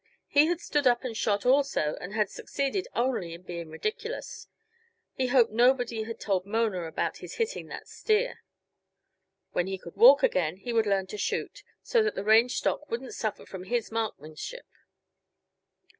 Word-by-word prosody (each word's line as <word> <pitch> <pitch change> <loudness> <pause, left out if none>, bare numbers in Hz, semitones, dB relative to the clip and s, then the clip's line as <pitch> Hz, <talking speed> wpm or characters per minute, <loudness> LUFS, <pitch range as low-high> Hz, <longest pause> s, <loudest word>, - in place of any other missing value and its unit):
He 290 +2 +5
had 345 0 0
stood 295 -5 +1
up 240 +1 +3
and 245 -3 -4
shot, 205 -1 0
also 260 - +2
and 180 - -6
had 210 -1 +1
succeeded 280 +8 -2
only 235 -9 -1
in 170 - -14
being 170 -2 -6
ridiculous; 440 - -5 0.7
he 260 - -1
hoped 245 -3 +4
nobody 240 0 +3
had 230 0 -7
told 190 -3 0
Mona 205 -3 -1
about 160 - -2
his - - -9
hitting 460 +1 -2
that - - -8
steer. 460 +3 0 1.1
When 175 - 0
he 190 0 -3
could 170 -2 -12
walk 250 +7 +8
again 175 -1 +1
he 240 +4 -5
would 225 -2 +2
learn 195 -1 +1
to 205 +3 -8
shoot, - - -2 0.2
so 470 - +3
that 430 -1 0
the - - -3
range 225 +4 +5
stock 300 - -1
wouldn't 240 +3 -4
suffer 215 -2 -3
from 185 -1 -8
his 235 +3 -1
marksmanship. 220 - -5
230 Hz, 170 wpm, -28 LUFS, 190-275 Hz, 1.1 s, walk